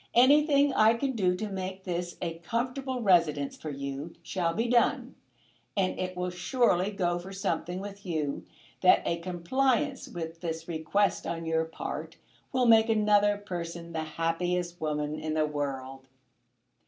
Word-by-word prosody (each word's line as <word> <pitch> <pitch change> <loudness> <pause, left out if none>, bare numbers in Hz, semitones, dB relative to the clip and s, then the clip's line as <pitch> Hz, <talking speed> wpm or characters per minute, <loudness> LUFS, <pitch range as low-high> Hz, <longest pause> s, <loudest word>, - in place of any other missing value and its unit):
Anything 285 +2 +5
I 220 -1 +5
can 270 +3 -1
do 185 -7 +1
to 215 +3 -3
make 190 0 -5
this 175 -1 -3
a 165 -1 -4
comfortable 250 +5 -2
residence 160 -7 +3
for 155 - -7
you 140 +3 -5
shall 175 -3 -1
be 225 +7 -1
done; 240 0 +2 0.6
and 190 -2 +1
it 185 0 -3
will 180 0 -2
surely 180 +1 +2
go 175 -4 0
for 185 +2 -9
something 185 -2 -2
with 200 0 -8
you, 155 -6 -2 0.4
that - - +6
a 170 - 0
compliance 260 - 0
with 165 -1 -6
this 165 -1 -4
request 170 +5 0
on 165 0 -3
your 160 0 +1
part 160 - -6 0.3
will 255 -1 +2
make 225 -1 +6
another 205 -1 +4
person 170 -4 -6
the 160 - -1 0.2
happiest 175 +1 -1
woman 150 0 -2
in 155 0 -3
the 155 -1 +3
world. 135 -3 -4
180 Hz, 155 wpm, -29 LUFS, 165-215 Hz, 0.6 s, that